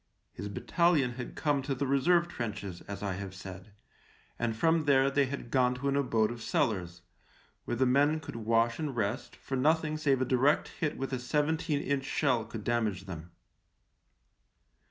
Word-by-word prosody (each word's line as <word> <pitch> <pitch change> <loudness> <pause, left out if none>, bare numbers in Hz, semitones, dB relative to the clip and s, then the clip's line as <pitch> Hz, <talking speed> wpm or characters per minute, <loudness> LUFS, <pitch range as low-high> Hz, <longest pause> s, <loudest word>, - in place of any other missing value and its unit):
His 100 +3 -6
battalion 155 - +2
had 120 0 -7
come 145 -3 +1
to 135 0 -2
the 140 - -1
reserve 170 +6 +3
trenches, 100 - -5
as 100 0 -6
I 100 -2 -1
have 95 0 -6
said, 95 +2 -9 0.7
and 115 -2 0
from 160 +6 +2
there 135 -1 +4
they 140 -1 +2
had 130 -3 -6
gone 125 -1 +3
to 135 +3 -3
an 140 - +1
abode 115 -6 +2
of 120 -1 -7
cellars, 95 - -1 0.6
where 120 - -2
the 130 - +3
men 145 +5 +3
could 145 -3 -8
wash 115 +2 +1
and 150 -5 -3
rest, 110 +3 -2
for 135 - -5
nothing 155 +3 +2
save 140 -4 +2
a 130 - +1
direct 130 +3 +2
hit 155 -2 -3
with 135 0 -4
a 130 - -1
seventeen 150 +3 0
inch 140 -1 -1
shell 120 -4 +1
could 115 -1 -7
damage 110 -5 0
them. 85 -3 -8
130 Hz, 175 wpm, -30 LUFS, 110-145 Hz, 0.7 s, there